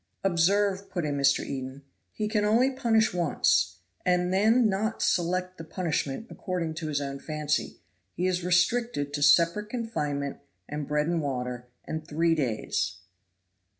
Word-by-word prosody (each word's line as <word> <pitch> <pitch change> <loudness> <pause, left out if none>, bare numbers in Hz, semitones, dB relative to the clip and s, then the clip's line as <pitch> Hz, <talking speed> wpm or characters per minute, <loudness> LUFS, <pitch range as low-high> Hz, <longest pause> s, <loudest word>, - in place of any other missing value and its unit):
"Observe," 195 +2 +2
put 180 -4 -2
in 145 -1 -1
Mr. 140 0 +3
Eden, 135 0 -6 0.3
"he 215 - -2
can 210 -1 +1
only 235 +6 +3
punish 230 -5 +2
once, 145 - +2 0.3
and 180 0 +2
then 220 +5 +4
not 215 +3 -1
select 185 +1 0
the - - -5
punishment 160 0 -2
according 180 -4 -3
to 160 0 -5
his 145 -2 0
own 140 -1 -4
fancy; 150 0 -2 0.4
he 180 - -1
is 180 -1 0
restricted 180 -4 +1
to 145 - -2
separate 170 +8 +4
confinement, 150 - -3 0.3
and 150 -1 -4
bread 150 0 +1
and 170 0 0
water, 125 -3 -3 0.2
and 155 0 -5
three 165 +1 +2
days." 110 - -1
170 Hz, 150 wpm, -27 LUFS, 145-195 Hz, 0.4 s, then